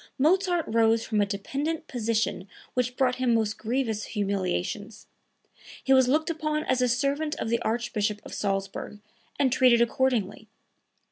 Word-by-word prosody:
Mozart 350 +3 +2
rose 225 0 +2
from 215 -2 +1
a 200 - +1
dependent 280 +11 -3
position 225 -5 -1 0.3
which 250 0 -1
brought 255 -2 +2
him 250 -2 +2
most 220 -1 0
grievous 225 -2 -1
humiliations; 200 +1 -3 0.8
he 270 - +3
was 260 -1 +5
looked 310 +5 +1
upon 305 -1 -2
as 255 -3 0
a 250 - +3
servant 280 +5 0
of - - -4
the 235 0 0
Archbishop 220 -2 -1
of - - -9
Salzburg, 195 +1 -3 0.4
and 260 -3 +2
treated 250 -3 +5
accordingly. 235 -4 0
235 Hz, 145 wpm, -27 LUFS, 215-270 Hz, 0.8 s, was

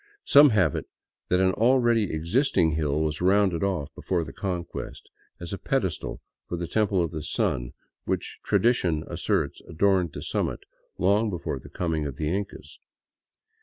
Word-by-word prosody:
Some 145 +1 +7
have 95 - +2
it - - -4 0.4
that 90 - +3
an 95 0 +4
already 120 -2 +3
existing 85 - +2
hill 75 -1 0
was 75 0 -1
rounded 95 -2 +3
off 90 -8 -2
before 90 -3 -1
the - - -9
Conquest, 90 -4 -5 0.3
as 85 +2 -7
a 100 - -4
pedestal 95 - -2 0.3
for 85 - -3
the 85 0 -4
Temple 100 -1 +1
of 85 - -3
the 80 -2 -5
Sun - - -1 0.3
which - - -3
tradition 90 -10 +2
asserts - - -1
adorned 90 -1 +2
the - - -6
summit - - -2 0.4
long 100 +4 +2
before 90 -4 -4
the - - -13
coming 80 -4 -2
of 70 - -6
the 80 +3 -1
Incas. 100 0 -6
90 Hz, 160 wpm, -26 LUFS, 80-100 Hz, 0.4 s, Some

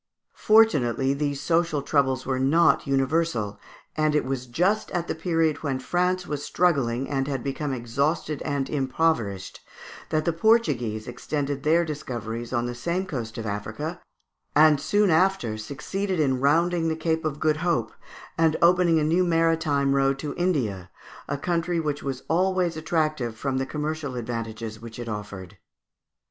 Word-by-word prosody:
Fortunately 140 - +3
these 145 -1 -2
social 165 -1 +1
troubles 135 -3 +1
were 130 -1 -1
not 150 +4 +3
universal, 135 -6 0 0.4
and 155 -1 +1
it 150 - +2
was 130 -1 -3
just 185 - +1
at 175 -1 -2
the - - -1
period 165 -2 0
when 140 -4 -1
France 180 +6 0
was 145 -3 -4
struggling 135 -8 +1
and 135 -1 -1
had 135 -4 -3
become 140 +1 -3
exhausted 140 +5 -1
and 140 -3 -2
impoverished 130 - -1 0.5
that 155 -1 0
the 170 - +1
Portuguese 150 - +1
extended 140 +2 -3
their 165 +3 +3
discoveries 120 -6 -5
on 120 -2 0
the 120 - -3
same 170 +9 -2
coast 120 -9 -5
of 115 - -4
Africa, 110 - -4 0.5
and 150 -1 +6
soon 205 +1 +2
after 160 - +2
succeeded 180 - -3
in 135 -4 +2
rounding 165 +4 +2
the 160 - 0
Cape 160 0 -1
of 150 -2 -3
Good 155 -1 +2
Hope, 160 -9 0 0.5
and 160 -1 +3
opening 175 -1 +4
a - - +1
new 165 +4 +3
maritime 165 -5 +2
road 135 0 +2
to 145 +1 -4
India, 115 - -1 0.4
a - - -2
country 170 +2 -1
which 150 -2 -2
was 135 -2 -4
always 180 0 +1
attractive 155 -7 -1
from 130 +2 -1
the 135 - -2
commercial 150 -2 -3
advantages 115 -2 -5
which 115 0 -10
it 120 -1 -6
offered. 105 -3 -7
145 Hz, 155 wpm, -25 LUFS, 125-165 Hz, 0.5 s, and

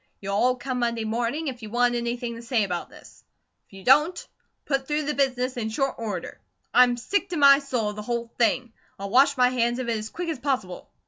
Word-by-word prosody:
You'll 200 0 -4
all 250 +5 +3
come 255 0 -4
Monday 235 -1 -1
morning, 240 +8 -2
if 250 -3 -5
you 215 - -8
want 245 +2 +2
anything 240 0 -3
to 230 - -9
say 235 -2 0
about 180 -3 -3
this. - - -16 0.4
If - - -27
you 195 0 -11
don't, 300 - +4
I'll - - -12 0.3
put 270 -2 -1
through 300 0 0
the 300 +1 -1
business 255 -2 0
in 220 -2 -2
short 270 +4 -1
order. 205 -6 -5 0.3
I'm 245 -1 +5
sick 390 +11 -1
to 350 - -3
my 280 -1 +7
soul 250 -7 -2
of - - -11
the - - -4
whole 235 +1 -4
thing. 235 +1 +1 0.2
I'll 195 0 -6
wash 280 +3 +4
my 250 0 +5
hands 240 -1 0
of 255 -2 -3
it 230 - 0
as 215 +1 -6
quick 350 0 -5
as 315 - -3
possible." 245 -10 -3
245 Hz, 235 wpm, -25 LUFS, 230-270 Hz, 0.4 s, my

